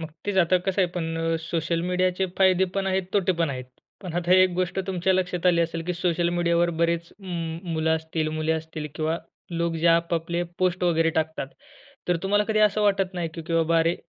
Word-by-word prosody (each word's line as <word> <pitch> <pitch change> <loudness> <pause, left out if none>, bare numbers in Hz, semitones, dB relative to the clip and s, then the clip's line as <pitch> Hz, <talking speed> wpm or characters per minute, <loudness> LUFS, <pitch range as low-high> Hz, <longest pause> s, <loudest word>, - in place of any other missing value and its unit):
मग 160 -1 -6 0.2
तेच 205 -1 -1
आता 185 +1 +4
कसं 195 0 +1
आहे 180 - +1
पण 165 -2 -3
अ, 165 0 0
सोशल 165 0 -1
मीडियाचे 180 +1 +1
फायदे 190 -1 +5
पण 195 -1 -1
आहेत 190 0 +1
तोटे 190 -2 +2
पण 165 -3 0
आहेत. 130 -2 -5 0.4
पण 180 -3 -6
आता 175 0 +1
एक 185 0 +6
गोष्ट 185 +1 -1
तुमच्या 190 0 +1
लक्षात 180 -1 0
आली 170 -1 +4
असेल, 165 0 -1
की 180 - -1
सोशल 170 -1 0
मीडियावर 170 0 +2
बरेच 170 0 0
उम्म 170 -4 -4
मुलं 160 0 0
असतील, 160 0 -3
मुले 155 +1 -1
असतील 160 -1 -4
किंवा 160 +2 -1 0.3
लोक 170 0 -1
जे 165 +1 0
आपआपले 170 +1 +1 0.2
पोस्ट 185 -1 0
वगैरे 165 -2 +3
टाकतात. 160 -2 -2 0.6
तर 175 - +3
तुम्हाला 205 +2 +2
कधी 215 0 0
असं 210 0 +3
वाटत 195 -2 +1
नाही, 175 -2 -2
की 165 - -6
बाबा 165 0 +3
अरे, 165 +1 +2
170 Hz, 205 wpm, -25 LUFS, 165-185 Hz, 0.6 s, एक